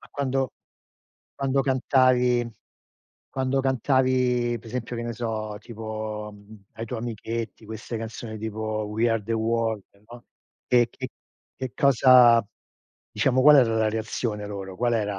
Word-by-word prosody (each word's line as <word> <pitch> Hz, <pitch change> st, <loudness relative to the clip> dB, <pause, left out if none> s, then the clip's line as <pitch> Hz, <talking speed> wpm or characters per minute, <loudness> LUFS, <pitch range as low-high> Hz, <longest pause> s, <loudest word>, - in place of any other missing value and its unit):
ma -, -, -17 dB
quando 135 Hz, -2 st, -1 dB, 0.8 s
quando 135 Hz, 0 st, 0 dB
cantavi 130 Hz, -2 st, +3 dB, 0.8 s
quando 130 Hz, 0 st, 0 dB
cantavi 130 Hz, -2 st, +1 dB
per 115 Hz, -, -16 dB
esempio, 120 Hz, 0 st, -4 dB
che 115 Hz, -, -3 dB
ne 120 Hz, 0 st, -3 dB
so, 110 Hz, -2 st, -4 dB
tipo 110 Hz, -2 st, -6 dB, 0.4 s
ai 115 Hz, -, -6 dB
tuoi 120 Hz, +1 st, -4 dB
amichetti 115 Hz, 0 st, -5 dB
queste 110 Hz, +2 st, -6 dB
canzoni 110 Hz, 0 st, -6 dB
tipo 110 Hz, 0 st, -3 dB
We 110 Hz, +3 st, +1 dB
are 115 Hz, -1 st, 0 dB
the 115 Hz, +3 st, -4 dB
world, 115 Hz, -1 st, 0 dB, 0.3 s
no, 120 Hz, 0 st, -12 dB, 0.4 s
che 120 Hz, -1 st, +4 dB
che -, -, -7 dB, 0.5 s
che 130 Hz, -2 st, -5 dB
cosa 125 Hz, -3 st, +6 dB, 0.7 s
diciamo, 130 Hz, 0 st, +2 dB
qual 150 Hz, +1 st, +8 dB
era 120 Hz, -4 st, +4 dB
la 110 Hz, -1 st, +2 dB
reazione 110 Hz, -1 st, -3 dB
loro? 95 Hz, -2 st, -7 dB
Qual 120 Hz, +2 st, +1 dB
era 105 Hz, -3 st, -1 dB
115 Hz, 140 wpm, -25 LUFS, 110-125 Hz, 0.8 s, qual